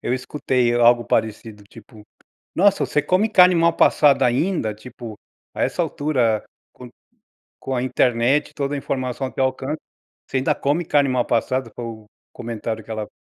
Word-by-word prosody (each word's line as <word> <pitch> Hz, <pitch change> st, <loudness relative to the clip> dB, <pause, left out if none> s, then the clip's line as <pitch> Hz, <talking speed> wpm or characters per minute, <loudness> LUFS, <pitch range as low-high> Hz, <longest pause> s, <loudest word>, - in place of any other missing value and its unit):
eu 125 Hz, -, -1 dB
escutei 125 Hz, -2 st, -1 dB
algo 120 Hz, 0 st, +4 dB
parecido, 110 Hz, -1 st, -2 dB
tipo: 105 Hz, +2 st, -16 dB, 0.5 s
"Nossa, 200 Hz, +2 st, +3 dB
você 150 Hz, -, 0 dB
come 185 Hz, +8 st, +1 dB
carne 180 Hz, -3 st, +6 dB
mal 165 Hz, 0 st, +3 dB
passada 145 Hz, -3 st, +4 dB
ainda" 125 Hz, -, 0 dB
tipo 115 Hz, 0 st, -10 dB, 0.4 s
"A -, -, -5 dB
essa -, -, -1 dB
altura, 125 Hz, -7 st, 0 dB, 0.3 s
com 125 Hz, -1 st, -12 dB, 0.7 s
com 135 Hz, -, -4 dB
a 125 Hz, -, -1 dB
internet, 125 Hz, +2 st, +1 dB
toda 140 Hz, 0 st, -3 dB
a -, -, -2 dB
informação 130 Hz, -1 st, -3 dB
ao -, -, -11 dB
teu 135 Hz, -, 0 dB
alcance, 135 Hz, +3 st, -3 dB, 0.5 s
você 135 Hz, -, -1 dB
ainda 130 Hz, -, +1 dB
come 150 Hz, +5 st, -1 dB
carne 145 Hz, -2 st, +2 dB
mal 125 Hz, -1 st, +1 dB
passada", 120 Hz, +1 st, -1 dB
foi 120 Hz, -, -6 dB
o 110 Hz, -2 st, -8 dB, 0.3 s
comentário 115 Hz, -1 st, -5 dB
que -, -, -16 dB
ela 110 Hz, -1 st, -4 dB
125 Hz, 170 wpm, -21 LUFS, 115-145 Hz, 0.7 s, carne